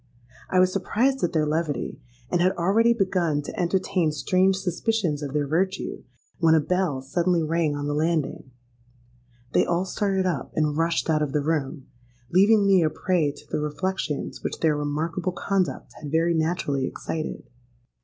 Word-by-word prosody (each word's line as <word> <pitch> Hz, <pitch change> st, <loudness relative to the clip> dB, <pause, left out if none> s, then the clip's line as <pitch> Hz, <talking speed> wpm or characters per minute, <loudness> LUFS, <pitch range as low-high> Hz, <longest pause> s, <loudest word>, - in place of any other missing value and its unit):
I 185 Hz, -, +3 dB
was 185 Hz, 0 st, +4 dB
surprised 250 Hz, +7 st, 0 dB
at 175 Hz, -, +1 dB
their 155 Hz, -2 st, +1 dB
levity, 150 Hz, -3 st, -2 dB, 0.3 s
and 175 Hz, -, +2 dB
had 185 Hz, +2 st, +3 dB
already 200 Hz, +7 st, +3 dB
begun 180 Hz, -9 st, +1 dB
to -, -, -7 dB
entertain 180 Hz, -2 st, +1 dB
strange 185 Hz, +5 st, +2 dB
suspicions 185 Hz, -3 st, -1 dB
of 145 Hz, -2 st, -4 dB
their 145 Hz, 0 st, 0 dB
virtue, 185 Hz, +6 st, -1 dB, 0.4 s
when 165 Hz, -1 st, +5 dB
a -, -, +5 dB
bell 160 Hz, -4 st, -1 dB
suddenly 170 Hz, +4 st, +1 dB
rang 160 Hz, -1 st, 0 dB
on 145 Hz, 0 st, -3 dB
the 145 Hz, -, -1 dB
landing. 155 Hz, -3 st, -1 dB, 1.0 s
They -, -, +4 dB
all 175 Hz, +2 st, 0 dB
started 190 Hz, -1 st, 0 dB
up, 180 Hz, -, -2 dB
and 150 Hz, -1 st, +1 dB
rushed 165 Hz, +1 st, 0 dB
out 155 Hz, -2 st, +2 dB
of 145 Hz, -2 st, -1 dB
the 150 Hz, -, +1 dB
room—leaving 145 Hz, -, 0 dB
me 195 Hz, -2 st, +5 dB
a 160 Hz, -, +3 dB
prey 165 Hz, -2 st, 0 dB
to 145 Hz, -, -15 dB
the -, -, 0 dB
reflections 150 Hz, +1 st, -3 dB
which -, -, -3 dB
their 160 Hz, -2 st, +3 dB
remarkable 160 Hz, +5 st, -2 dB
conduct 190 Hz, 0 st, -2 dB
had 150 Hz, -, -6 dB
very 165 Hz, +2 st, +2 dB
naturally 155 Hz, -5 st, 0 dB
excited. 155 Hz, -1 st, -5 dB
165 Hz, 165 wpm, -25 LUFS, 150-185 Hz, 1.0 s, when